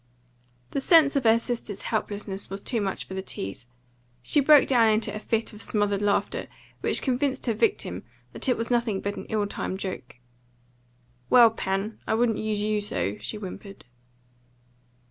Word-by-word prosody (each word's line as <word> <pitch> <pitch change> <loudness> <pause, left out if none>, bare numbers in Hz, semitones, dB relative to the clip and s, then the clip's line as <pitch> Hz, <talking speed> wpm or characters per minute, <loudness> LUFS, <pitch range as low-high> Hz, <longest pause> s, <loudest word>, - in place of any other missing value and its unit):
The 275 - -2
sense 305 -1 +5
of 275 -3 0
her 225 0 +6
sister's 230 -4 -4
helplessness 205 -2 -3
was 195 +1 -5
too 235 -4 -1
much 195 -2 -2
for - - -8
the 190 - -3
tease; 105 - -6 0.6
she 295 - +3
broke 290 0 +6
down 240 -4 +4
in 215 0 +3
a 215 - -4
fit 225 +1 -2
of 210 - -11
smothered 205 -2 0
laughter, 205 -1 0 0.3
which - - +1
convinced 265 +1 0
her 235 - +1
victim 400 - 0 0.3
that - - 0
it 250 - +2
was 230 +1 -3
nothing 235 -5 +1
but 200 0 -3
an - - -7
ill 215 -1 0
timed 190 -1 -4
joke. 185 -10 -6 1.1
"Well, 235 -2 +7
Pen, 195 0 -3
I - - +1
wouldn't 230 -1 +1
use 215 -1 -1
you 210 0 0
so," 105 - -2
she 115 - -5
whimpered. 195 -2 -9
215 Hz, 170 wpm, -26 LUFS, 200-240 Hz, 1.1 s, Well